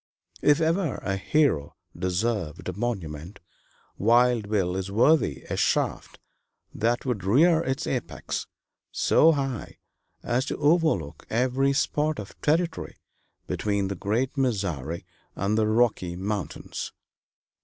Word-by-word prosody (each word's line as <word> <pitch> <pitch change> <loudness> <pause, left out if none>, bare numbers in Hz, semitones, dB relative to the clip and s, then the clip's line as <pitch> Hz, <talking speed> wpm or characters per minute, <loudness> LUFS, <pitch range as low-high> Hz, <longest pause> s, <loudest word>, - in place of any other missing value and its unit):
If 145 +1 +4
ever 165 - +1
a 95 -1 -2
hero 95 - +1 0.2
deserved 90 -2 -2
a 90 - -2
monument, 95 -5 -4 0.6
Wild 120 0 +3
Bill 95 -4 +1
is 95 0 -3
worthy 110 - +3
a - - -2
shaft - - 0 0.6
that 120 +4 0
would 120 -7 -2
rear 160 - +4
its 135 -4 -2
apex 125 -3 -3 0.4
so 165 +1 +4
high 135 -5 -3 0.5
as 125 +2 0
to - - -3
overlook 150 - +1
every 130 +4 +2
spot 150 +2 0
of 100 - -7
territory 165 +2 0 0.5
between 100 -2 -1
the 100 - -3
great 115 +9 -1
Missouri 95 - -1 0.3
and 100 +2 0
the 110 -1 +2
Rocky 110 -6 +1
Mountains. 100 +2 -4
110 Hz, 120 wpm, -26 LUFS, 95-135 Hz, 0.6 s, If